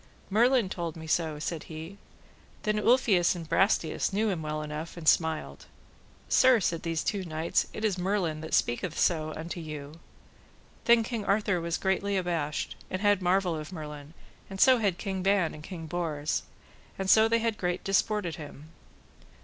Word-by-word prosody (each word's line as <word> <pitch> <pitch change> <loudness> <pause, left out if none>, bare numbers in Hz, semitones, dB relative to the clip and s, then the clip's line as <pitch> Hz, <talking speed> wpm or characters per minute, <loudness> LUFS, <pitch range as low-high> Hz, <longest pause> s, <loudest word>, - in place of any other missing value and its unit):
Merlin 240 +1 +4
told 170 -3 -4
me 160 -1 -9
so, 160 -1 0
said 155 +1 -4
he. 160 +5 -9 0.6
Then 210 0 +1
Ulfius 210 -7 +3
and 165 -2 -7
Brastias 195 -1 +1
knew 215 +3 +1
him 175 -4 -3
well 155 0 -3
enough, 150 +3 -6
and 160 -2 -7
smiled. 160 -1 +1 0.6
Sir, 255 -2 +5
said 170 -4 -1
these 165 -1 -2
two 200 -3 -1
knights, 160 -1 0
it 220 - -4
is 195 -4 0
Merlin 180 -5 -1
that 160 - -1
so - - +6
speaketh 155 +9 +1
unto 160 +1 -5
you. 150 -1 -8 0.9
Then 235 -1 +6
King 225 -2 -3
Arthur 200 -3 +1
was 170 0 -1
greatly 195 +1 0
abashed, 165 -5 -2
and 185 - -3
had 205 -2 +3
marvel 180 -1 +2
of 155 +1 -6
Merlin, 150 -2 -8 0.3
and 195 0 -7
so 255 +1 +6
had 200 -5 +1
King 190 -2 -3
Ban 195 -3 +2
and 150 - -10
King 165 -1 -7
Bors, 155 -2 -2 0.6
and 190 - -3
so 220 +3 +6
they 230 +1 +3
had 230 -1 -1
great 180 0 -1
disport 205 +1 +1
at 170 - -4
him. 150 0 -10
175 Hz, 175 wpm, -28 LUFS, 160-200 Hz, 0.9 s, so